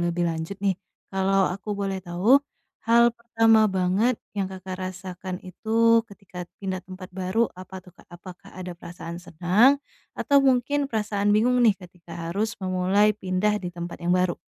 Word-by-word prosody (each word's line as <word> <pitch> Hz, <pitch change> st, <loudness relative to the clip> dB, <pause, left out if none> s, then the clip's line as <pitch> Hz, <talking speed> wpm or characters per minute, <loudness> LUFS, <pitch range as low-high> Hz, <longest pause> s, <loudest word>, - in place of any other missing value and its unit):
lebih 175 Hz, -, -1 dB
lanjut 165 Hz, +4 st, -5 dB
nih. 195 Hz, -2 st, +2 dB, 0.4 s
Kalau 195 Hz, 0 st, +2 dB
aku 200 Hz, +3 st, -4 dB
boleh 195 Hz, -1 st, -2 dB
tahu, 190 Hz, +10 st, +4 dB, 0.5 s
hal 235 Hz, 0 st, +6 dB
pertama 225 Hz, -2 st, +3 dB
banget 190 Hz, +6 st, +2 dB, 0.2 s
yang 195 Hz, -2 st, -1 dB
Kakak 185 Hz, 0 st, -7 dB
rasakan 185 Hz, 0 st, -6 dB
itu, 230 Hz, +4 st, +3 dB
ketika 195 Hz, -3 st, -10 dB, 0.2 s
pindah 190 Hz, -2 st, -3 dB
tempat 185 Hz, 0 st, -10 dB
baru 190 Hz, +5 st, +1 dB
apa 185 Hz, +1 st, -9 dB
tuh, 180 Hz, -, -16 dB
Kak? -, -, -20 dB
Apakah 185 Hz, +2 st, -12 dB
ada 180 Hz, -1 st, -7 dB
perasaan 170 Hz, 0 st, -8 dB
senang, 190 Hz, -, +3 dB, 0.4 s
atau 280 Hz, -1 st, +4 dB
mungkin 270 Hz, +2 st, +2 dB
perasaan 205 Hz, -2 st, 0 dB
bingung 240 Hz, +4 st, +3 dB
nih, 210 Hz, -4 st, +5 dB
ketika 175 Hz, -2 st, -14 dB, 0.2 s
harus 210 Hz, +5 st, -1 dB
memulai 190 Hz, +3 st, +2 dB
pindah 190 Hz, +2 st, 0 dB
di 180 Hz, -, -3 dB
tempat 170 Hz, 0 st, -7 dB
yang 175 Hz, -, +1 dB
baru? 180 Hz, -1 st, +2 dB
190 Hz, 160 wpm, -25 LUFS, 180-220 Hz, 0.5 s, hal